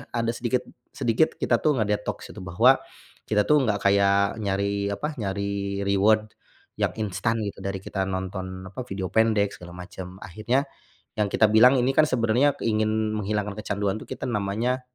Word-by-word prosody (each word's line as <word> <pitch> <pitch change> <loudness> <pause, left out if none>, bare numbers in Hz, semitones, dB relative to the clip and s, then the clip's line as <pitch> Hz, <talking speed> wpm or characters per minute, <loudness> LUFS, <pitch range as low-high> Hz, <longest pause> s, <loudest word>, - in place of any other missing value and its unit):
ada 115 -1 -1
sedikit, 125 +1 0 0.3
sedikit 125 +3 +1
kita - - +3
tuh 150 -5 +3
ngedetoks 105 -1 -2
itu 105 - -10
bahwa 115 +9 +5 0.5
kita, 105 -1 +1
tuh, 150 - +6
gak 105 -4 0
kayak 100 0 +3
nyari 100 -1 -1
apa, 150 +9 -4
nyari 100 -2 -3
reward 110 +2 +3 0.5
yang - - 0
instan 110 +3 -1
gitu 100 -2 -5
dari 95 -1 -3
kita 95 0 -3
nonton, 95 0 -5
apa, 120 +7 -7
video 95 -6 -4
pendek 110 -2 +2
segala 85 0 -11
macam. 90 +1 -9
Akhirnya 120 +9 -1 0.5
yang 105 - +2
kita 105 +1 +3
bilang 125 +5 +7
ini, 125 +1 +2
kan, 155 +2 +4
sebenarnya 125 +3 +2
keingin 110 -1 0
menghilangkan 105 0 -2
kecanduan, 100 0 -2
tuh, - - -12
kita - - -6
namanya 115 +2 -1
105 Hz, 160 wpm, -25 LUFS, 100-115 Hz, 0.5 s, bilang